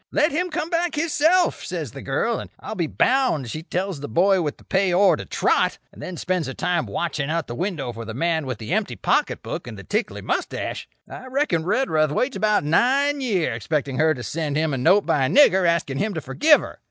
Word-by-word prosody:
'Let 300 +2 +2
him 355 +5 -1
come 335 0 -3
back, 335 -1 0
hisself,' 330 +3 +2
says 165 -9 -5
the 135 - -9
girl; 185 +13 -1
and - - -8
I'll - - -6
be 175 -6 -1
bound 245 - +1
she 155 - -5
tells 180 0 -3
the 145 - -6
boy 190 +3 +3
with 150 -3 -3
the - - -19
pay 190 -1 +1
ore 190 +3 +5
to - - -7
trot; - - +1
and - - -14
then 180 -2 -6
spends 180 -2 -1
her 135 - -6
time 175 -8 -1
watching 150 +5 -2
out 165 -1 -1
the 120 - -7
window 145 -5 -3
for 115 0 -7
the 110 0 -7
man 160 0 0
with 130 -4 -3
the 110 +10 -5
empty 215 0 -1
pocket - - 0
book - - -5
and - - -8
the - - -9
tickly - - -2
moustache. - - -3 0.2
"I 260 - -9
reckon 255 - 0
Redruth 165 - +1
waits 255 - 0
about 210 -6 +2
nine 275 - +2
year 195 - 0
expecting 140 +3 -2
her 155 0 +3
to 120 - -7
send 150 +5 -3
him 155 -1 0
a - - -1
note 185 +10 +4
by 140 - +1
a - - -2
nigger 190 -11 +5
asking 140 -5 -1
him 210 +1 -1
to 160 - -3
forgive 290 - +4
her. - - -9
175 Hz, 230 wpm, -23 LUFS, -, 0.2 s, ore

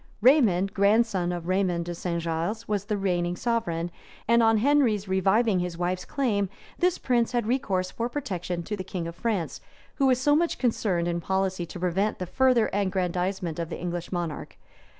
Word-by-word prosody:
Raymond, 210 - +4
grandson 200 -3 +2
of 175 -1 -5
Raymond 185 -2 +1
de 175 - -4
St. 170 0 -3
Gilles 170 +7 -2
was 205 -2 -1
the 210 -1 -1
reigning 175 -3 0
sovereign; 175 -7 -1 0.4
and 235 +1 +5
on 225 -1 +4
Henry's 230 -5 +2
reviving 190 +2 +2
his 175 -1 -3
wife's 180 +1 -2
claim, 210 -9 0 0.3
this 360 0 +2
prince 240 -1 +1
had 240 -2 +1
recourse 195 -7 0
for 235 +1 -3
protection 180 - -3
to 210 - -3
the 190 - -5
king 175 -2 -4
of 170 - -6
France, 195 -2 -2 0.4
who 275 - +3
was 255 -1 +3
so 290 +2 +3
much 335 +2 +1
concerned 200 -8 0
in 170 0 -1
policy 190 -1 -1
to 180 - -8
prevent 185 +4 0
the 180 - -4
further 250 +3 +3
aggrandizement 185 -3 -1
of 165 -1 -3
the - - -5
English 175 0 -4
monarch. 175 -4 -4
190 Hz, 180 wpm, -26 LUFS, 175-230 Hz, 0.4 s, and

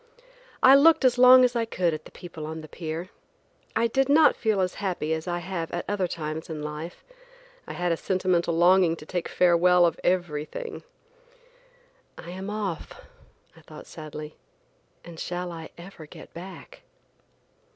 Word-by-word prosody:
I 260 - +9
looked 285 +1 +6
as 245 -1 +3
long 255 0 +8
as 245 0 -1
I 235 - +1
could 180 -6 -1
at 155 - -6
the - - -13
people 165 -3 -9
on 160 0 -6
the 155 - -11
pier. 165 +4 -6 0.6
I 230 - +2
did 270 +4 +1
not 300 +1 +5
feel 215 -3 0
as 180 -1 -1
happy 175 -5 -2
as 160 +2 -4
I 175 0 -1
have 175 -2 -5
at 175 - -4
other 200 -3 -1
times 155 -1 -5
in 155 -2 -5
life. 150 +3 -7 0.6
I - - -6
had 175 0 -1
a 165 - 0
sentimental 180 -3 0
longing 175 0 +4
to 155 - -12
take 175 +1 -3
farewell 180 0 +4
of 170 - -1
everything. 180 - -2 1.4
"I 170 - -9
am 190 +2 -6
off," 205 -6 -4 0.6
I - - -17
thought - - -12
sadly, 155 0 -9 0.7
"and 170 -1 -11
shall 175 0 -4
I 165 -1 -8
ever 170 -3 -12
get - - -13
back?" 185 +3 -11
175 Hz, 165 wpm, -26 LUFS, 160-195 Hz, 1.4 s, I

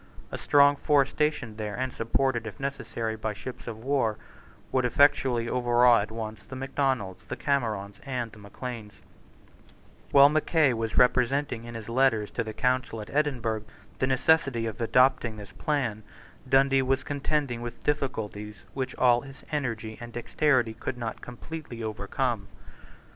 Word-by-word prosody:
A - - -4
strong 145 0 +5
force 140 -2 +3
stationed 150 -8 -1
there, 105 -1 -3
and 130 0 -2
supported, 120 0 0
if 105 - -8
necessary, 120 -5 -3
by 110 -1 -3
ships 125 +7 -9
of 115 -2 -5
war, 115 -3 0 0.5
would 130 - +2
effectually 125 -2 +3
overawe 120 -1 +4
at 105 - -4
once 110 -1 -6
the 130 - -10
Macdonalds, 130 -7 -1
the - - -5
Camerons, 110 -8 -1
and 125 -4 -3
the 105 - -14
Macleans, 105 0 -8 1.1
While 140 0 +8
Mackay 155 -2 +3
was 115 -1 -3
representing 125 -1 +2
in 120 -1 -8
his 110 -2 -7
letters 115 -3 +2
to 115 - -2
the 110 - -5
council 125 -1 0
at 105 - -8
Edinburgh 125 -7 0 0.4
the 130 - +2
necessity 135 -3 +2
of 110 0 -5
adopting 115 -1 +3
this 100 -4 -10
plan, 125 -7 -1 0.5
Dundee 135 0 +4
was 130 0 +1
contending 140 -3 -1
with 120 0 -7
difficulties 105 -8 -3
which 130 -1 -3
all 120 -1 +4
his 135 0 -13
energy 115 -7 -3
and 120 0 -8
dexterity 125 -1 +1
could 120 +2 -5
not 115 -2 -5
completely 125 -1 -8
overcome. 110 +1 -2
120 Hz, 150 wpm, -27 LUFS, 110-135 Hz, 1.1 s, While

